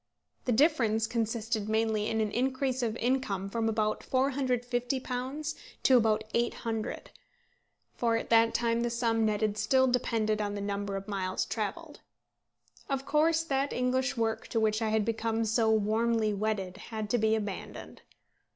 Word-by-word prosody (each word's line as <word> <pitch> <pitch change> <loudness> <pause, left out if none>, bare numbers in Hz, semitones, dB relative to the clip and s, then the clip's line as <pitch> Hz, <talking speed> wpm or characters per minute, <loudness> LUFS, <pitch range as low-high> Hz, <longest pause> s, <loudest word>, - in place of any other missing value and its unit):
The 250 - +1
difference 230 -5 +3
consisted 225 -1 -2
mainly 220 -1 +1
in 220 0 0
an 215 -1 -1
increase 260 +2 0
of 230 -2 -1
income 220 -7 -1
from 225 0 0
about 215 -1 0
£450 255 +2 -1 0.3
to 260 - +6
about 220 -2 +2
£800; 230 -2 -2 0.9
for 230 -1 +1
at 230 - -6
that 230 0 +5
time 235 0 +1
the 240 - 0
sum 230 -2 +1
netted 210 0 0
still 260 +4 +3
depended 225 -4 +1
on 205 0 -2
the - - -3
number 200 0 -3
of 195 0 -5
miles 190 -2 -2
travelled. 295 +9 -4 0.9
Of 270 -1 -1
course 315 +3 +3
that 275 -2 0
English 255 +1 0
work 225 -1 -1
to 225 - 0
which 215 0 +1
I 220 - +1
had 215 -1 +1
become 225 0 -1
so 220 +1 +2
warmly 220 +1 +2
wedded 200 -3 -2
had 215 0 -5
to 245 - +2
be 220 0 +3
abandoned. 210 -3 -6
225 Hz, 150 wpm, -30 LUFS, 215-250 Hz, 0.9 s, to